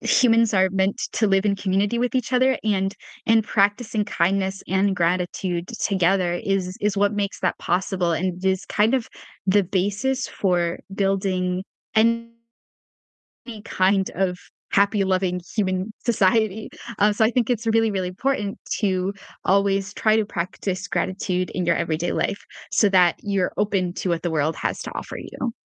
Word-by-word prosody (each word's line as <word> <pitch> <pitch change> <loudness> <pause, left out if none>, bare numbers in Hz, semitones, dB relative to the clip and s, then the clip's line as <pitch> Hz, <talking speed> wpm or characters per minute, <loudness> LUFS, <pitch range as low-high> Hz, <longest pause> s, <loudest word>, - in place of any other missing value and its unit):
humans 230 -3 +3
are 190 0 +4
meant 190 +1 +1 0.2
to 220 - +2
live 195 0 +2
in 200 -1 +2
community 200 +4 0
with 245 +1 -1
each 255 0 -1
other, 255 +1 +3
and 195 -2 0 0.3
and 225 -1 +5
practicing 210 +1 +1
kindness 190 0 0
and 190 +1 +2
gratitude 175 0 -1 0.2
together 185 -2 +2
is 185 0 -2
is 210 -1 +1
what 205 +1 +2
makes 205 -1 -2
that 185 - 0
possible, 180 -1 0
and 180 +2 -1
it - - +4
is 190 -1 0
kind 215 +4 +2
of 250 -4 -1 0.4
the 200 +1 +4
basis 205 +8 -1
for 175 -3 0 0.2
building 190 -2 0 0.3
any 230 +1 +3 1.4
kind 190 +1 +1
of 180 0 0 0.3
happy, 200 0 +3
loving 185 -1 0 0.2
human 190 0 0
society. 220 -1 +2 0.3
Um, 210 +1 +4
so 220 - +3
I 220 - +4
think 245 -2 0
it's 230 -1 -1
really, 225 0 +3
really 190 -3 -2
important 205 +1 -2 0.2
to 190 -1 0 0.3
always 195 0 +2
try 215 0 +3
to 220 - +1
practice 190 +1 -4
gratitude 185 -1 -1
in 180 - -2
your 170 - +3
everyday 165 0 -1
life 200 - -2 0.3
so 210 0 +4
that 180 -3 +4
you're 200 -3 0
open 195 -4 0
to 185 - -2
what 170 -1 0
the 175 - -1
world 155 0 0
has - - -2
to - - -7
offer - - -6
you. 240 -3 -5
195 Hz, 160 wpm, -23 LUFS, 185-210 Hz, 1.4 s, and